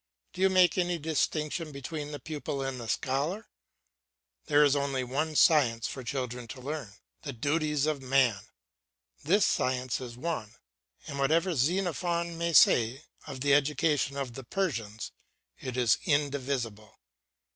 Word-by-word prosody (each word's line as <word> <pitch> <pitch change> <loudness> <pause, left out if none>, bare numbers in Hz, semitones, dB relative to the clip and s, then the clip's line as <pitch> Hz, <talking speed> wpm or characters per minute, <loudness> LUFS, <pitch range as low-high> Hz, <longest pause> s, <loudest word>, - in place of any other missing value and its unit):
Do 185 - -6
you 190 - +5
make 185 -1 +4
any 175 -1 0
distinction 155 0 -1
between 145 +2 -6
the 145 - -6
pupil 145 -3 -4
and 135 -1 -4
the 115 - -7
scholar? 145 - -1 1.0
There 145 +1 +5
is 145 -1 +4
only 140 -2 -1
one 150 +5 -2
science 120 -8 +4
for 130 - -6
children 125 -1 -4
to 130 - -8
learn 135 -5 -5 0.3
the - - -6
duties 150 +3 0
of 155 -3 -1
man. 130 -6 +2 0.8
This 195 +8 +3
science 130 -1 0
is 120 -2 -8
one, 125 -7 -4 0.5
and, 140 - -6
whatever 165 +6 +2
Xenophon 170 +2 0
may 170 0 -1
say 125 0 +5 0.2
of 130 -2 -7
the 140 0 +3
education 145 -1 +2
of 135 -4 -3
the 135 - -8
Persians, 115 - -3 0.5
it 130 -1 -5
is 120 -2 +3
indivisible. 135 - -1
140 Hz, 145 wpm, -29 LUFS, 125-160 Hz, 1.0 s, you